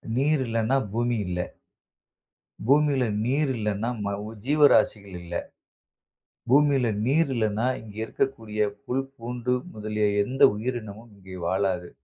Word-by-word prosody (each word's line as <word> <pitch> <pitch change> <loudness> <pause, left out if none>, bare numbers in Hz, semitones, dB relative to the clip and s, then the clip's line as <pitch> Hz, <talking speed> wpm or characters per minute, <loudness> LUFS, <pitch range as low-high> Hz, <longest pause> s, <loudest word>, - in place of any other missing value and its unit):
நீர் 145 +3 +2
இல்லன்னா, 115 +3 +1 0.2
பூமி 120 +1 0
இல்ல. 90 0 -3 1.3
பூமில 140 -1 +4 0.2
நீர் 135 +4 +1
இல்லனா 105 +1 -1 0.2
ம - - -1 0.4
ஜீவராசிகள் 130 -9 +3
இல்ல. 85 0 -7 1.1
பூமியில் 140 -3 +4 0.2
நீர் 145 +3 +3
இல்லனா 110 0 0 0.2
இங்கு 105 -1 -12
இருக்கக்கூடிய 110 -3 -1 0.2
புல், 130 +2 -1
பூண்டு 125 +1 -2 0.2
முதலிய 105 0 -1 0.2
எந்த 130 +5 -5
உயிரினமும் 110 -1 -5
இங்கே 95 -1 -11
வாழாது. 95 -1 0
115 Hz, 110 wpm, -26 LUFS, 105-135 Hz, 1.3 s, பூமில